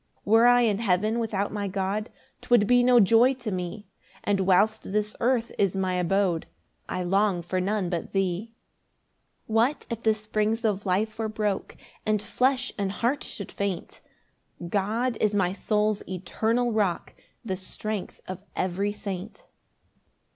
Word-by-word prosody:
3 205 - -5
Were 225 +2 +7
I 245 0 +6
in 215 -4 +2
heaven 215 +2 +1
without 205 -3 -1
my 205 -1 -2
God, 195 +3 -2 0.3
'Twould 240 -4 +4
be 245 +3 +5
no 245 0 +6
joy 230 +6 +5
to 240 -4 -5
me; 185 +3 -4 0.4
And 205 -1 +1
whilst 195 +3 +2
this 210 0 -1
earth 240 -1 +1
is 200 -2 +2
my 185 -1 0
abode, 180 -1 +1 0.4
I 185 - -2
long 195 0 +1
for 185 +2 -1
none 200 0 0
but 170 -2 -3
thee. 195 +3 -1 0.9
4 220 - -4
What 250 +7 +2
if 230 -1 -3
the 220 -1 +3
springs 215 +2 -1
of 205 -2 0
life 215 +4 0
were 220 -1 -1
broke, 210 -2 -2 0.3
And 215 -1 +1
flesh 255 +5 0
and 195 -1 0
heart 240 +7 0
should 200 -1 -7
faint! 200 -3 -4 0.7
God 220 +6 0
is 210 -1 +2
my 185 -2 +2
soul's 210 0 0
eternal 220 +6 0
rock, 205 -6 0 0.3
The 190 - -1
strength 200 +2 -5
of 185 0 -5 0.2
every 190 +3 -1
saint. 200 0 -6
210 Hz, 155 wpm, -26 LUFS, 190-225 Hz, 0.9 s, Were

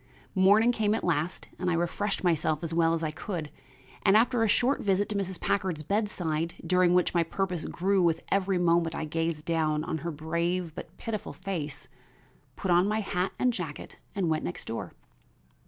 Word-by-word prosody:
Morning 205 +5 +5
came 215 -2 +1
at - - -3
last, 170 0 -1
and 180 0 0
I 170 - +2
refreshed 185 +5 -1
myself 160 -2 +1
as 165 0 -3
well 165 0 +3
as 165 - -3
I 155 - -1
could, 155 -2 -5 0.5
and, 195 +2 +5
after 240 +1 +3
a 225 - +4
short 245 +6 +2
visit 200 0 +1
to 210 - -3
Mrs. 190 -3 -2
Packard's 185 -6 -1
bedside 170 -5 -1
during 180 0 +4
which 180 - +2
my 170 - +3
purpose 180 0 -2
grew 195 +2 +1
with 165 -2 +2
every 195 -1 +2
moment 170 -1 +2
I 160 - -2
gazed 165 0 -2
down 155 -2 +1
on 160 - -3
her 170 - -4
brave 170 +2 -2
but - - -9
pitiful 220 -2 -4
face, 165 -6 -5 0.7
put 195 - -2
on 175 +2 +5
my 215 +1 +1
hat 185 -2 -1
and 250 -1 +2
jacket 165 -8 -6 0.2
and 190 -3 0
went 155 -1 0
next 90 - -5
door. - - -5
175 Hz, 190 wpm, -28 LUFS, 165-195 Hz, 0.7 s, Morning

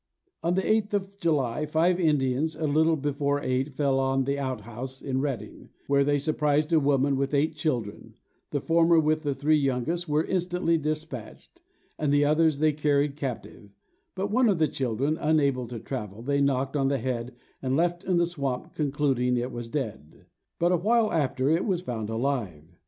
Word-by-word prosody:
On 170 +2 +1
the 190 - +1
8th 215 -1 +1
of 200 0 -2
July, 150 - 0
five 170 +4 +2
Indians, 150 -1 +1
a 155 - -3
little 160 +2 +3
before 145 -1 -1
night, 130 +1 -2
fell 135 -2 +1
on 135 0 +1
an 140 0 0
out 130 -5 -3
house 125 +5 -7
in 130 -1 -2
Reading, 125 -8 -5 0.2
where 140 0 +3
they 145 +1 +2
surprised 150 +1 +1
a 160 - +6
woman 140 -1 +2
with 140 +2 0
eight 155 +3 +1
children: 125 -9 -3 0.3
the 145 - -1
former, 165 +2 +4
with 155 0 +1
the 145 -3 -2
three 150 +3 +2
youngest, 140 +6 -1
were 150 +1 +2
instantly 180 -2 0
despatched, 155 -6 -6 0.4
and 150 -2 +1
the 145 0 +4
others 155 0 +3
they 155 +1 +2
carried 145 -1 +1
captive; 125 -6 -6 0.5
but 195 +2 -2
one 245 +1 +4
of 195 - +2
the 160 -1 +3
children, 135 +3 -1
unable 140 -5 +1
to 120 0 -6
travel, 110 -4 -6
they 140 +2 +1
knocked 135 0 0
on 135 -2 +2
the 140 0 +1
head, 120 0 -3 0.3
and 130 0 0
left 175 +2 0
in 185 -3 +1
the 170 - +3
swamp, 140 -7 -4
concluding 135 -4 0
it 120 +2 -2
was 120 -1 -6
dead; 110 - -6 0.3
but 175 +1 +2
awhile 215 +6 +2
after, 140 -4 0
it 165 +4 +2
was 185 -4 0
found 110 -9 -4
alive. 110 - -3
145 Hz, 185 wpm, -27 LUFS, 130-160 Hz, 0.5 s, a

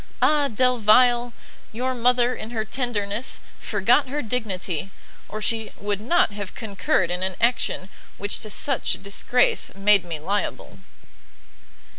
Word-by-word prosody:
Ah 285 +3 +3
Delvile! 245 0 +3 0.4
your 255 +4 -2
mother, 245 0 +2
in 220 - -6
her 220 -2 -3
tenderness, 220 -2 -1 0.2
forgot 235 +7 +2
her 295 +2 -3
dignity, 195 -7 -3 0.4
or 215 0 -6
she 225 -1 -1
would 205 0 -2
not 255 +1 +2
have 205 -2 -7
concurred 200 -5 -1
in 180 +1 -1
an 190 0 -1
action 235 -5 0 0.3
which 205 +1 -1
to 215 - -4
such 270 +5 0
disgrace 245 +5 +2
made 200 -1 +4
me 170 -3 -5
liable!" 195 +7 -3
220 Hz, 130 wpm, -23 LUFS, 200-250 Hz, 0.4 s, made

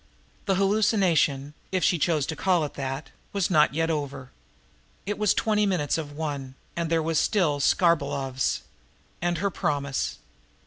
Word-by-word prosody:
The 195 - +3
hallucination, 190 -8 +2 0.2
if 185 -2 0
she 175 - +3
chose 155 -3 +1
to 160 - -4
call 180 -3 +2
it 145 - -7
that, 135 +1 -5 0.2
was 195 -3 0
not 150 -4 +4
yet 165 +1 +1
over! 140 -4 -4 0.7
It 205 +1 -3
was 210 -2 +3
twenty 210 -1 +2
minutes 170 -7 0
of 150 -3 -4
one, 145 -4 -4 0.2
and 170 -1 -2
there 165 -1 +2
was 160 -1 +1
still 165 -9 +2
Skarbolov's 140 -5 +1 0.6
and 175 0 0
her 200 +4 0
promise. 140 -4 -1
160 Hz, 150 wpm, -26 LUFS, 145-185 Hz, 0.7 s, not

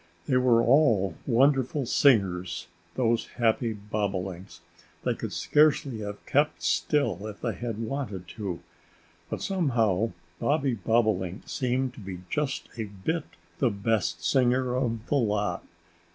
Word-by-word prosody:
They 130 - +3
were 120 -2 +4
all 115 - +4
wonderful 135 +2 +3
singers 100 -9 +2 0.3
those 120 -2 +1
happy 115 0 +2
Bobolinks. 100 -4 -4 0.4
They - - +1
could - - -5
scarcely 145 -5 +2
have 105 -1 -6
kept 150 +2 +1
still 110 - +1
if 105 -2 -9
they - - -1
had 115 -3 -4
wanted 115 -6 -4
to. 100 -6 -5 0.7
But - - -4
somehow 115 - +1 0.3
Bobby 140 -3 +1
Bobolink 105 -3 0
seemed 130 0 -1
to - - -12
be 95 -3 -7
just 150 -3 -1
a 110 - -2
bit 105 - -3 0.3
the 130 - +3
best 100 -5 -1
singer 125 +5 +2
of 115 -3 -1
the 145 - 0
lot. 105 -6 0
115 Hz, 130 wpm, -27 LUFS, 100-130 Hz, 0.7 s, were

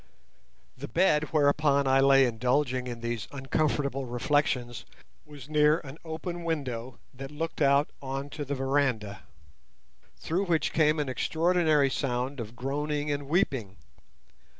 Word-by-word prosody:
The - - -7
bed 150 +1 +2
whereon 145 -1 +3
I 135 0 +4
lay 135 0 +6
indulging 125 +2 0
in 120 -1 -6
these 120 -1 -3
uncomfortable 140 -1 -1
reflections 120 -1 0 0.4
was 145 -3 -11
near 150 0 +4
an 145 +1 -11
open 170 +2 -5
window 130 -7 -3 0.2
that 135 +1 -8
looked 160 +2 -5
on 140 -1 0
to 150 - -5
the 140 0 -3
veranda, 130 -7 -1 1.0
through 180 +5 -1
which 165 -5 0
came 155 0 +3
an 150 -2 -1
extraordinary 160 0 +2
sound 130 0 -2
of 115 0 -7
groaning 145 +3 -2
and 145 -1 -3
weeping. 130 - 0
140 Hz, 125 wpm, -28 LUFS, 130-150 Hz, 1.0 s, lay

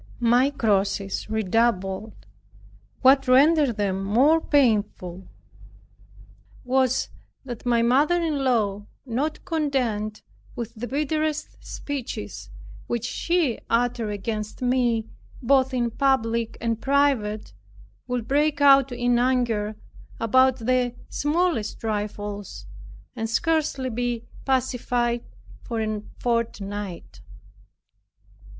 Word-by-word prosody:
My 245 +4 +4
crosses 200 -6 0
redoubled. 220 -1 -1 0.8
What 270 0 +5
rendered 280 -1 +4
them 195 -2 -1
more 265 +11 +4
painful 205 - +1 1.4
was, 260 0 +1 0.4
that 245 -1 -7
my 235 -1 +3
mother 285 +9 +3
in 310 -5 -1
law, 210 -5 0 0.2
not 275 +6 -2
content 255 - -1 0.3
with 235 -2 -5
the 240 +1 -6
bitterest 305 +2 -2
speeches 105 - -6 0.4
which 235 -1 -2
she 330 -1 0
uttered 235 -1 +1
against 210 +1 -4
me, 245 -3 +1 0.3
both 265 +1 +3
in 240 -2 0
public 235 -4 0
and 230 -1 -2
private, 270 -7 +1 0.5
would 245 -2 -3
break 295 +1 +2
out 275 -2 +6
in 245 0 +1
anger 235 -4 +1 0.4
about 260 +3 +4
the 245 +1 0
smallest 295 - 0
trifles, 205 -2 -4 0.5
and 225 -2 -3
scarcely 285 -1 0
be 240 0 -2 0.2
pacified 245 -2 0 0.4
for 230 - -4
a 215 -1 -2 0.2
fortnight. 205 -5 -3
240 Hz, 95 wpm, -24 LUFS, 215-270 Hz, 1.4 s, out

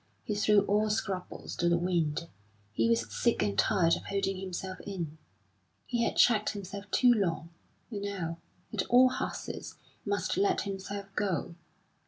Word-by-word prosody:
He 210 - -2
threw 205 0 +4
all 210 +2 +2
scruples 195 -3 -3
to 175 - +2
the 170 - +4
wind. 170 -3 0 0.5
He 115 +1 +2
was 115 -2 +1
sick - - +2
and 100 -1 0
tired 165 - +3
of - - -8
holding 195 -1 -1
himself 185 0 -5
in; 170 -6 -5 0.7
he 240 -2 0
had - - 0
checked 215 -3 +4
himself 200 0 -7
too 250 -1 +5
long, 170 -6 -1 0.4
and 205 -2 -4
now, 180 -5 -3 0.3
at 210 - +1
all 255 +1 +7
hazards, 255 - -5 0.3
must 205 -1 -1
let 200 - +2
himself 200 0 -5
go. 190 -5 -1
195 Hz, 155 wpm, -30 LUFS, 170-205 Hz, 0.7 s, all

